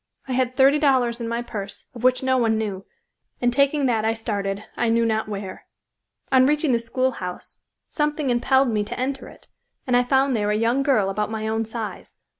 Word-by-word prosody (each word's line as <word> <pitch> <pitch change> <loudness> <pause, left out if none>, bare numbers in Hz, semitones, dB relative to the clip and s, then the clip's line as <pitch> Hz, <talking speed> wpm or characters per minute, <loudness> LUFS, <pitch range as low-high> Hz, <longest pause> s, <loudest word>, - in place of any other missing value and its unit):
I - - -5
had 255 0 0
thirty 275 +2 +5
dollars 255 -5 +2
in 230 - -3
my 235 +1 -2
purse, 200 -4 -7
of 240 -2 -10
which 255 +1 +3
no 260 0 +2
one 225 -2 +2
knew, 200 -3 -4 0.5
and 245 -1 +1
taking 280 +2 +2
that 230 -4 +1
I 225 +1 +1
started, 200 -3 -3
I 235 - 0
knew 230 0 +2
not 220 -1 0
where. 200 -2 -7 0.6
On 260 0 +5
reaching 300 0 +1
the 235 - +2
schoolhouse 230 -6 -3 0.3
something 295 -3 -1
impelled 265 +2 +3
me 210 -2 0
to 205 - -6
enter 265 +1 -3
it, - - -16 0.4
and 250 - +1
I 245 - +4
found 265 +1 +2
there 210 -2 0
a 210 - +1
young 230 +5 +1
girl 235 -9 +2
about 210 +2 -2
my 220 0 -3
own 220 +1 -1
size. 220 -1 -6
235 Hz, 205 wpm, -23 LUFS, 220-260 Hz, 0.6 s, thirty